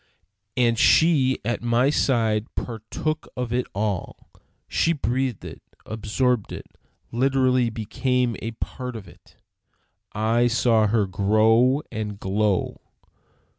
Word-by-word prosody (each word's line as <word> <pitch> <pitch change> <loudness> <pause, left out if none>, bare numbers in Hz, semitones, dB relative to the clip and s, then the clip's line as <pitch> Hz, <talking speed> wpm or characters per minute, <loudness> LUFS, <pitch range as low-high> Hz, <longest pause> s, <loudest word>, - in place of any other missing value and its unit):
And 120 -2 +2
she 145 -6 +4
at 120 +1 -1
my 120 +3 +2
side 115 -6 +1
partook 120 +7 -4
of 125 -2 -3
it 125 0 0
all; 100 -3 -3 0.4
she 165 - +1
breathed 130 - -2
it, - - -9 0.2
absorbed 110 +1 -1
it, - - -7 0.5
literally 130 -1 +2
became 120 +2 -1
a 115 - -3
part 125 +2 -6
of 105 -4 -8
it. 85 - -19 0.8
I 115 +3 +2
saw 115 -2 +3
her 105 -1 +2
grow 110 +8 +3
and 105 -2 -5
glow. 100 0 0
115 Hz, 115 wpm, -24 LUFS, 110-125 Hz, 0.8 s, she